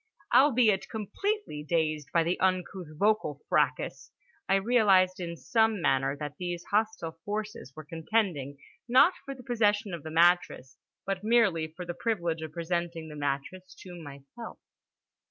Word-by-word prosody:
Albeit 245 Hz, -6 st, +4 dB
completely 310 Hz, -, -3 dB
dazed 155 Hz, -2 st, -1 dB
by 170 Hz, -, +3 dB
the 170 Hz, +2 st, -1 dB
uncouth 185 Hz, -1 st, -1 dB
vocal 200 Hz, -7 st, +1 dB
fracas, -, -, 0 dB, 0.4 s
I 195 Hz, -, +5 dB
realised 195 Hz, -4 st, +3 dB
in 170 Hz, -2 st, -5 dB
some 220 Hz, +1 st, +1 dB
manner 135 Hz, -3 st, +1 dB
that 150 Hz, 0 st, -6 dB
these 175 Hz, -1 st, -4 dB
hostile 205 Hz, -6 st, -1 dB
forces 210 Hz, -, -5 dB
were 155 Hz, -1 st, -9 dB
contending, 160 Hz, -4 st, -1 dB, 0.3 s
not 260 Hz, +9 st, +6 dB
for 275 Hz, -, -6 dB
the 255 Hz, -, -13 dB
possession 210 Hz, -5 st, +1 dB
of 170 Hz, -, -5 dB
the 160 Hz, -, -7 dB
mattress, 170 Hz, -4 st, +2 dB, 0.3 s
but 195 Hz, 0 st, -3 dB
merely 210 Hz, -8 st, +3 dB
for 170 Hz, +3 st, -9 dB
the 175 Hz, -, -4 dB
privilege 170 Hz, -7 st, -2 dB
of 160 Hz, -1 st, -6 dB
presenting 170 Hz, 0 st, -3 dB
the 150 Hz, -, -9 dB
mattress 145 Hz, +6 st, -4 dB
to 175 Hz, -2 st, -10 dB
myself. 145 Hz, -, -10 dB
180 Hz, 145 wpm, -29 LUFS, 160-215 Hz, 0.4 s, not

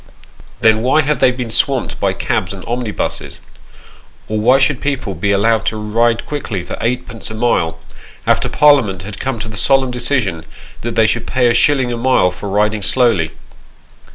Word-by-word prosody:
Then 110 Hz, 0 st, +4 dB
why 130 Hz, +6 st, +3 dB
have 150 Hz, 0 st, -1 dB
they -, -, +5 dB
been 125 Hz, -2 st, -4 dB
swamped 135 Hz, +1 st, 0 dB
by -, -, +1 dB
cabs -, -, -2 dB
and -, -, -10 dB
omnibuses? 120 Hz, -2 st, -3 dB, 0.9 s
Or 110 Hz, 0 st, -2 dB
why 125 Hz, +5 st, +4 dB
should 135 Hz, -1 st, +1 dB
people 140 Hz, -8 st, -2 dB
be 100 Hz, +2 st, -1 dB
allowed 110 Hz, +2 st, +2 dB
to 110 Hz, -, -1 dB
ride 115 Hz, +2 st, 0 dB
quickly 115 Hz, -11 st, -4 dB
for -, -, -6 dB
eightpence 120 Hz, -3 st, -3 dB
a 110 Hz, -, -7 dB
mile, 90 Hz, -8 st, 0 dB, 0.5 s
after -, -, +2 dB
Parliament 125 Hz, -12 st, +3 dB
had 105 Hz, +1 st, -8 dB
come 135 Hz, -3 st, -2 dB
to 115 Hz, -, -5 dB
the 110 Hz, 0 st, -8 dB
solemn 135 Hz, -2 st, +2 dB
decision 120 Hz, -, -1 dB, 0.4 s
that 120 Hz, 0 st, -4 dB
they 110 Hz, -, +4 dB
should 110 Hz, -, -1 dB
pay 125 Hz, -2 st, +2 dB
a -, -, +2 dB
shilling 130 Hz, 0 st, +2 dB
a -, -, -3 dB
mile 120 Hz, -7 st, +2 dB
for 100 Hz, +3 st, -7 dB
riding 105 Hz, +1 st, +1 dB
slowly 110 Hz, -6 st, +2 dB
115 Hz, 180 wpm, -16 LUFS, 105-130 Hz, 0.9 s, they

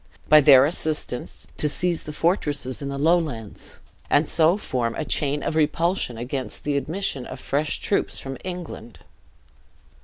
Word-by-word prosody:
By 155 Hz, 0 st, +8 dB
their 135 Hz, -2 st, +8 dB
assistance, 150 Hz, -5 st, -3 dB
to 150 Hz, -, 0 dB
seize 175 Hz, +2 st, 0 dB
the 150 Hz, -, -7 dB
fortresses 150 Hz, -6 st, 0 dB
in 140 Hz, -, -4 dB
the 140 Hz, -, -4 dB
Lowlands, 150 Hz, -, -1 dB, 0.3 s
and 145 Hz, +1 st, +3 dB
so 165 Hz, +3 st, +3 dB
form 120 Hz, -, -2 dB
a 155 Hz, -, -3 dB
chain 145 Hz, -1 st, 0 dB
of 155 Hz, -, -2 dB
repulsion 160 Hz, -3 st, +1 dB
against 130 Hz, +3 st, -4 dB
the 145 Hz, -1 st, -1 dB
admission 145 Hz, -3 st, -2 dB
of 130 Hz, -, -8 dB
fresh 150 Hz, +4 st, -1 dB
troops 200 Hz, -, 0 dB
from 135 Hz, -1 st, -6 dB
England. 175 Hz, -10 st, -7 dB
150 Hz, 150 wpm, -24 LUFS, 135-165 Hz, 0.3 s, By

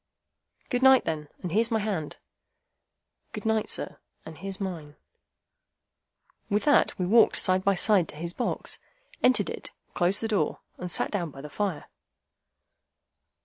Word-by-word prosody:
"Good 245 Hz, -1 st, +1 dB
night, 265 Hz, -1 st, +6 dB
then, 150 Hz, -2 st, -3 dB
and 180 Hz, -, -3 dB
here's 225 Hz, +5 st, +3 dB
my 225 Hz, -, +1 dB
hand." 200 Hz, -8 st, -3 dB, 1.2 s
"Good -, -, -6 dB
night, 220 Hz, -1 st, +1 dB
sir, -, -, -3 dB, 0.3 s
and 160 Hz, -, -9 dB
here's 195 Hz, +1 st, -5 dB
mine." 165 Hz, -7 st, -5 dB, 1.5 s
With 205 Hz, 0 st, +1 dB
that 290 Hz, -, +4 dB
we 180 Hz, -, -1 dB
walked 225 Hz, +5 st, +5 dB
side 185 Hz, 0 st, +2 dB
by 200 Hz, 0 st, +3 dB
side 185 Hz, -2 st, +4 dB
to -, -, -10 dB
his 170 Hz, +3 st, -5 dB
box, 245 Hz, -, -2 dB, 0.4 s
entered 255 Hz, -, +3 dB
it, -, -, -7 dB, 0.2 s
closed 180 Hz, +3 st, +1 dB
the 225 Hz, -, -1 dB
door, 210 Hz, -3 st, 0 dB, 0.2 s
and 180 Hz, -1 st, -4 dB
sat -, -, +1 dB
down 175 Hz, -6 st, -2 dB
by 135 Hz, -1 st, -11 dB
the 150 Hz, +1 st, -9 dB
fire. 195 Hz, -5 st, -2 dB
195 Hz, 150 wpm, -27 LUFS, 170-220 Hz, 1.5 s, night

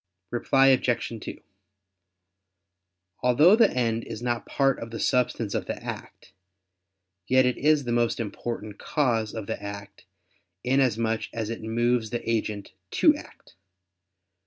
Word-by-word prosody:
Reply 135 Hz, +3 st, +3 dB
Obj. 125 Hz, -2 st, +1 dB
2: -, -, -8 dB, 1.8 s
Although 145 Hz, -, +6 dB
the 225 Hz, -2 st, +5 dB
end 115 Hz, -2 st, -1 dB
is 115 Hz, +1 st, -7 dB
not 120 Hz, -1 st, -2 dB
part 135 Hz, -1 st, +1 dB
of 115 Hz, -, -7 dB
the 115 Hz, -, -6 dB
substance 125 Hz, -4 st, 0 dB
of -, -, -2 dB
the -, -, -2 dB
act, -, -, -8 dB, 0.9 s
yet 130 Hz, 0 st, +4 dB
it 125 Hz, -, 0 dB
is 150 Hz, 0 st, +3 dB
the 120 Hz, -, -3 dB
most 120 Hz, 0 st, +1 dB
important 110 Hz, -1 st, -5 dB
cause 115 Hz, -8 st, 0 dB
of 110 Hz, -2 st, -5 dB
the -, -, -4 dB
act, 100 Hz, -2 st, -8 dB, 0.6 s
inasmuch 115 Hz, -4 st, +1 dB
as 115 Hz, -1 st, -3 dB
it 115 Hz, -, -5 dB
moves 115 Hz, +1 st, 0 dB
the 120 Hz, 0 st, -4 dB
agent 105 Hz, -3 st, -2 dB, 0.2 s
to -, -, +5 dB
act. -, -, -13 dB
120 Hz, 135 wpm, -26 LUFS, 110-125 Hz, 1.8 s, Although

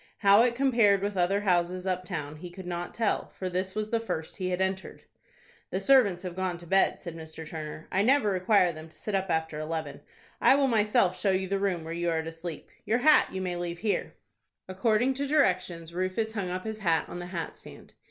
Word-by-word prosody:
How 200 Hz, +1 st, +7 dB
it 240 Hz, 0 st, +2 dB
compared 230 Hz, -7 st, +3 dB
with 205 Hz, 0 st, -2 dB
other 190 Hz, +3 st, +2 dB
houses 180 Hz, -1 st, +1 dB
up 185 Hz, -1 st, -1 dB
town 155 Hz, -5 st, -5 dB
he 175 Hz, +3 st, -8 dB
could 185 Hz, +1 st, -10 dB
not 175 Hz, 0 st, -4 dB
tell, 230 Hz, -2 st, -1 dB
for 185 Hz, -, -3 dB
this 185 Hz, +1 st, -2 dB
was 215 Hz, 0 st, -3 dB
the 230 Hz, -, +2 dB
first 160 Hz, -8 st, -5 dB
he 185 Hz, -2 st, -2 dB
had 180 Hz, 0 st, -1 dB
entered. 190 Hz, 0 st, -3 dB, 0.7 s
"The -, -, -2 dB
servants 225 Hz, -10 st, +4 dB
have 180 Hz, -2 st, -5 dB
gone 185 Hz, -2 st, -2 dB
to 175 Hz, -, -13 dB
bed," 190 Hz, +3 st, +2 dB
said 170 Hz, -3 st, -7 dB
Mr. 160 Hz, 0 st, -8 dB
Turner; 155 Hz, 0 st, -7 dB
"I 190 Hz, -, +2 dB
never 250 Hz, -1 st, +3 dB
require 185 Hz, -1 st, +3 dB
them 155 Hz, 0 st, -10 dB
to -, -, -18 dB
sit 210 Hz, -, -5 dB
up 195 Hz, -1 st, 0 dB
after 160 Hz, -2 st, -1 dB
eleven. 155 Hz, -1 st, -4 dB, 0.4 s
I -, -, +6 dB
will 280 Hz, -1 st, +3 dB
myself 210 Hz, -5 st, +2 dB
show 200 Hz, -, +1 dB
you 190 Hz, 0 st, +1 dB
the 195 Hz, +1 st, -1 dB
room 190 Hz, -4 st, -1 dB
where 165 Hz, +1 st, -5 dB
you 170 Hz, 0 st, -1 dB
are 160 Hz, -1 st, 0 dB
to 165 Hz, -, -6 dB
sleep. 165 Hz, 0 st, -8 dB
Your 225 Hz, -, +1 dB
hat 305 Hz, +5 st, +5 dB
you 190 Hz, -, -4 dB
may 180 Hz, -1 st, -2 dB
leave 175 Hz, 0 st, -4 dB
here." 210 Hz, +2 st, -2 dB, 0.5 s
According 215 Hz, +7 st, +1 dB
to 280 Hz, +2 st, -3 dB
directions, 180 Hz, -, +1 dB
Rufus 185 Hz, +5 st, -1 dB
hung 200 Hz, -5 st, -3 dB
up 185 Hz, +1 st, -4 dB
his 220 Hz, -1 st, -5 dB
hat 165 Hz, -6 st, +1 dB
on 175 Hz, -, -7 dB
the 175 Hz, -, -6 dB
hat 175 Hz, -3 st, -4 dB
stand. -, -, -13 dB
185 Hz, 225 wpm, -28 LUFS, 170-210 Hz, 0.7 s, How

